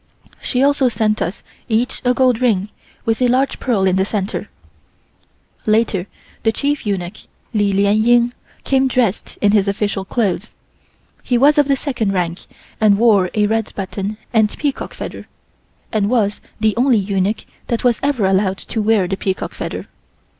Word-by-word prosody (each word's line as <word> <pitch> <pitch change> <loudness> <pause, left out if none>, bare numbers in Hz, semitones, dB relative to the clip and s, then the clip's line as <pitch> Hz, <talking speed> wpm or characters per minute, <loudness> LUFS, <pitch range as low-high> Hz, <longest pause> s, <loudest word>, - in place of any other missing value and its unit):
She 255 0 0
also 280 -2 +3
sent 215 -2 0
us 180 +6 -3 0.3
each 235 +3 0
a 250 0 +2
gold 255 -2 +2
ring 210 -5 +1 0.4
with 225 +2 0
a 250 - +4
large 260 +3 +1
pearl 220 -7 +1
in 190 0 +2
the 190 - +3
center. 200 0 -3 1.2
Later 215 -4 +2 0.3
the 225 - +2
chief 285 +1 -1
eunuch, 190 -1 -2 0.4
Li 205 -2 +2
Lien 200 +2 +3
Ying, 240 +1 +4 0.3
came 270 -1 +2
dressed 240 -5 -1
in 205 - +4
his 205 -2 +3
official 200 -1 -1
clothes. 205 -1 -2 0.7
He 245 - +1
was 290 +4 +5
of 290 - +4
the 275 - +3
second 240 -8 -2
rank 175 -1 -2 0.3
and 210 -2 +4
wore 205 -5 +4
a 210 -1 +3
red 220 +1 -1
button 195 +2 -4 0.2
and 220 -2 +2
peacock 285 -3 -3
feather - - -7 0.6
and 210 -3 +1
was 215 -4 +1 0.2
the 215 -1 +2
only 250 -1 +4
eunuch 200 +1 -1 0.2
that 235 - -1
was 240 -3 +2
ever 275 -7 +1
allowed 190 0 +2
to 220 - -4
wear 210 -3 +2
the 195 +1 -2
peacock 190 -1 -3
feather. - - -5
215 Hz, 165 wpm, -18 LUFS, 200-245 Hz, 1.2 s, was